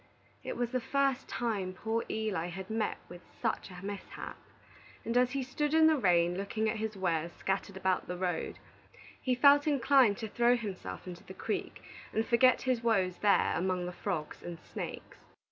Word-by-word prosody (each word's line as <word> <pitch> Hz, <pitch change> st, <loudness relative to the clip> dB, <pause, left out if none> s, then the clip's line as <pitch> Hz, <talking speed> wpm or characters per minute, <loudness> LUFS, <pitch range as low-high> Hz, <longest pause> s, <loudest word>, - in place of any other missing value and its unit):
It -, -, -4 dB
was 240 Hz, -1 st, -1 dB
the 255 Hz, -, +1 dB
first 275 Hz, +1 st, 0 dB
time 205 Hz, -6 st, -2 dB
poor 225 Hz, +4 st, -2 dB
Eli 215 Hz, -6 st, -1 dB
had 190 Hz, +4 st, -7 dB
met 220 Hz, -1 st, -1 dB
with 175 Hz, 0 st, -11 dB, 0.2 s
such -, -, -1 dB
a 180 Hz, +1 st, -9 dB
mishap, 200 Hz, -1 st, -6 dB, 0.7 s
and 230 Hz, -, -2 dB
as 250 Hz, +1 st, +3 dB
he 275 Hz, -1 st, -1 dB
stood 295 Hz, +4 st, -1 dB
in 320 Hz, 0 st, +7 dB
the 315 Hz, 0 st, +6 dB
rain 175 Hz, -, +3 dB
looking 215 Hz, +2 st, -1 dB
at 220 Hz, +1 st, 0 dB
his 215 Hz, -1 st, -3 dB
wares 170 Hz, -3 st, -1 dB
scattered 195 Hz, 0 st, -2 dB
about 190 Hz, -1 st, 0 dB
the 180 Hz, -, -4 dB
road, 180 Hz, -2 st, -2 dB, 0.6 s
he 255 Hz, -1 st, +1 dB
felt 285 Hz, +3 st, +6 dB
inclined 265 Hz, -6 st, +4 dB
to 225 Hz, -2 st, -4 dB
throw 240 Hz, +3 st, +3 dB
himself 205 Hz, -6 st, -6 dB
into 180 Hz, -1 st, -8 dB
the 190 Hz, -, -11 dB
creek, -, -, -4 dB, 0.3 s
and 220 Hz, +1 st, +1 dB
forget 255 Hz, +2 st, +4 dB
his 255 Hz, -3 st, +1 dB
woes 195 Hz, -6 st, +1 dB
there 205 Hz, -1 st, +3 dB
among 180 Hz, 0 st, 0 dB
the 180 Hz, -, -4 dB
frogs 175 Hz, -4 st, -4 dB
and 170 Hz, -1 st, -7 dB
snakes. -, -, -7 dB
215 Hz, 180 wpm, -31 LUFS, 185-245 Hz, 0.7 s, in